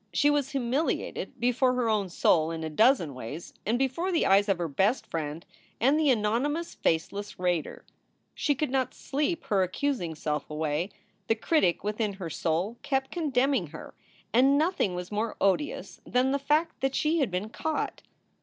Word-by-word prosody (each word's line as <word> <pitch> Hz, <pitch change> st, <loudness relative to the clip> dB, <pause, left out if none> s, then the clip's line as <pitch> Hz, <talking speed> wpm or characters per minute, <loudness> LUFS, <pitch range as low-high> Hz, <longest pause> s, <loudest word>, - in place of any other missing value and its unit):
She 290 Hz, -1 st, +3 dB
was 290 Hz, -2 st, +1 dB
humiliated 270 Hz, 0 st, -2 dB
before 250 Hz, +2 st, +2 dB
her 250 Hz, -2 st, +1 dB
own 210 Hz, -4 st, +1 dB
soul 160 Hz, -2 st, +3 dB
in 165 Hz, -1 st, -4 dB
a 160 Hz, -, -4 dB
dozen 215 Hz, -, +3 dB
ways 130 Hz, +7 st, -7 dB
and 230 Hz, +3 st, +2 dB
before 270 Hz, +8 st, 0 dB
the 335 Hz, -, +2 dB
eyes 200 Hz, +2 st, +4 dB
of 195 Hz, -, +3 dB
her 175 Hz, -1 st, -2 dB
best 195 Hz, -, +1 dB
friend 160 Hz, 0 st, -4 dB, 0.3 s
and 275 Hz, +7 st, +4 dB
the 305 Hz, -2 st, +3 dB
anonymous, 255 Hz, +8 st, 0 dB
faceless 200 Hz, +5 st, -1 dB
raider. 180 Hz, -3 st, -1 dB, 0.5 s
She 290 Hz, -, +1 dB
could 285 Hz, -1 st, -1 dB
not 260 Hz, -1 st, 0 dB
sleep 300 Hz, +4 st, -2 dB
her 210 Hz, -8 st, +1 dB
accusing 185 Hz, -, -1 dB
self 150 Hz, -1 st, -3 dB
away. 155 Hz, +3 st, -1 dB, 0.4 s
The 225 Hz, -, +3 dB
critic 220 Hz, -, +1 dB
within 210 Hz, 0 st, -1 dB
her 185 Hz, -4 st, -6 dB
soul 175 Hz, +10 st, -1 dB
kept 270 Hz, -2 st, -1 dB
condemning 270 Hz, -, +1 dB
her, 155 Hz, +1 st, -10 dB, 0.4 s
and 270 Hz, +4 st, +5 dB
nothing 305 Hz, -, +1 dB
was 180 Hz, +1 st, -6 dB
more 215 Hz, +2 st, -1 dB
odious 200 Hz, +10 st, 0 dB
than 255 Hz, +2 st, +1 dB
the 280 Hz, -, +1 dB
fact 300 Hz, +4 st, +1 dB
that 270 Hz, 0 st, 0 dB
she 315 Hz, +2 st, +2 dB
had 270 Hz, -7 st, +2 dB
been 185 Hz, +4 st, -3 dB
caught. 315 Hz, +7 st, -3 dB
230 Hz, 175 wpm, -28 LUFS, 180-275 Hz, 0.5 s, and